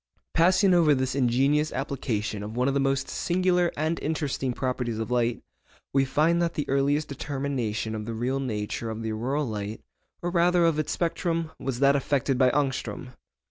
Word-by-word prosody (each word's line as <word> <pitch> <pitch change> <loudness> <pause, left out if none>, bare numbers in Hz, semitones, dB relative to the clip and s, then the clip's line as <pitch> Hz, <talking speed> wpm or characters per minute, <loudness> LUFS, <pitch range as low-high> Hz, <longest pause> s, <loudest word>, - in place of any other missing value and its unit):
Passing 185 +3 +4
over 160 -4 +5
this 130 -1 -1
ingenious 135 +4 +2
application 115 -6 -2
of 105 +3 -6
one 125 +1 +2
of 140 - +1
the 140 - +1
most 135 0 +1
singular 180 -1 +1
and 160 +3 0
interesting 145 -4 -2
properties 125 -2 -2
of 110 +2 -4
light, 120 -1 0 0.5
we 135 0 +3
find 160 +5 +2
that 170 -1 0
the 150 - -2
earliest 140 +2 +1
determination 135 -6 -3
of 105 0 -5
the 115 - -3
real 125 +4 -1
nature 115 -2 -3
of 110 0 -5
the 110 - -2
auroral 130 +7 -1
light—or 110 +10 -7
rather 175 0 +3
of 165 -2 +2
its 155 - -1
spectrum—was 165 -6 -2
that 140 0 +5
effected 135 -2 0
by 130 -1 +5
Ångström. 135 -1 -2
135 Hz, 170 wpm, -26 LUFS, 120-155 Hz, 0.5 s, over